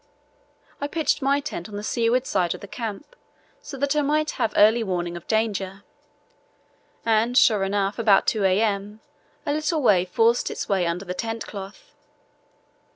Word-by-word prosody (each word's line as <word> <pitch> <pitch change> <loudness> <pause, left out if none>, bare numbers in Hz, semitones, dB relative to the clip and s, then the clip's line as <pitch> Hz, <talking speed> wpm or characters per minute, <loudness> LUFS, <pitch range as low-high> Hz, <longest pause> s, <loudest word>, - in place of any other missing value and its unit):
I 285 - -1
pitched 310 0 0
my 275 +1 +2
tent 280 - -6
on 205 - -9
the 205 - -5
seaward 235 +3 +1
side 180 -7 0
of - - -12
the 200 - -9
camp 225 - -7 0.5
so 290 - -8
that 285 +2 0
I 300 - +3
might 300 +2 +1
have 220 - -1
early 220 +3 +5
warning 175 -3 -3
of 175 - -10
danger, 200 -3 -1 1.2
and, 230 +2 +2
sure 215 -6 +5
enough, 195 +2 -1
about 210 -4 +4
2 215 -3 +1
a.m. 205 +2 0 0.4
a 290 - 0
little 310 +2 0
wave 185 -6 +3
forced 230 +5 +2
its - - -5
way 190 -4 +1
under 175 +3 -3
the 180 - -4
tent 225 +4 -4
cloth. 195 -1 -10
215 Hz, 165 wpm, -24 LUFS, 195-250 Hz, 1.2 s, early